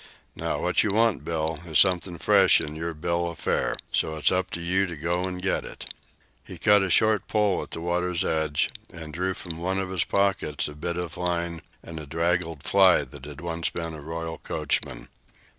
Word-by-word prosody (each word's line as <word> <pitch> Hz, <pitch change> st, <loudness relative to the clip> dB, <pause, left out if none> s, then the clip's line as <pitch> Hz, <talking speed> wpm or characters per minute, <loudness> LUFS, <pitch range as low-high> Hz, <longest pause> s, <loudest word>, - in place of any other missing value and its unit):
Now, -, -, -2 dB
what -, -, +2 dB
you -, -, +1 dB
want, 110 Hz, 0 st, +2 dB
Bill, 80 Hz, -1 st, -2 dB
is 80 Hz, -3 st, 0 dB
something 90 Hz, -2 st, +3 dB
fresh 100 Hz, 0 st, +5 dB
in 75 Hz, -, -4 dB
yer 85 Hz, +1 st, -4 dB
bill 85 Hz, +2 st, -1 dB
o' 85 Hz, -, -5 dB
fare. -, -, 0 dB, 0.2 s
So 80 Hz, -, 0 dB
it's 80 Hz, -, +3 dB
up 95 Hz, 0 st, 0 dB
to -, -, -3 dB
you 90 Hz, +3 st, +1 dB
to 85 Hz, -, -6 dB
go 85 Hz, +4 st, -1 dB
an' 90 Hz, -1 st, -4 dB
get 95 Hz, +1 st, -1 dB
it." -, -, -9 dB, 0.5 s
He -, -, -10 dB
cut 105 Hz, -1 st, +5 dB
a 95 Hz, -, 0 dB
short 110 Hz, +4 st, +3 dB
pole 105 Hz, -3 st, +2 dB
at -, -, -8 dB
the 80 Hz, -, -6 dB
water's 90 Hz, 0 st, 0 dB
edge 80 Hz, -2 st, 0 dB, 0.2 s
and 80 Hz, -3 st, -9 dB
drew 95 Hz, +3 st, -1 dB
from 85 Hz, -3 st, -7 dB
one 95 Hz, +3 st, -1 dB
of 95 Hz, -1 st, -2 dB
his 95 Hz, -3 st, +1 dB
pockets 100 Hz, -7 st, 0 dB
a 75 Hz, -, -7 dB
bit 85 Hz, +4 st, -4 dB
of 90 Hz, 0 st, -4 dB
line 85 Hz, -2 st, -2 dB, 0.2 s
and 80 Hz, -1 st, -7 dB
a 75 Hz, -, -8 dB
draggled 85 Hz, 0 st, -1 dB
fly 95 Hz, -2 st, +5 dB
that 70 Hz, -1 st, -11 dB
had 75 Hz, 0 st, -9 dB
once 85 Hz, -1 st, -2 dB
been 80 Hz, -1 st, -5 dB
a 75 Hz, -, -8 dB
royal 80 Hz, +1 st, -5 dB
coachman. -, -, -2 dB
85 Hz, 210 wpm, -26 LUFS, 80-95 Hz, 0.5 s, fresh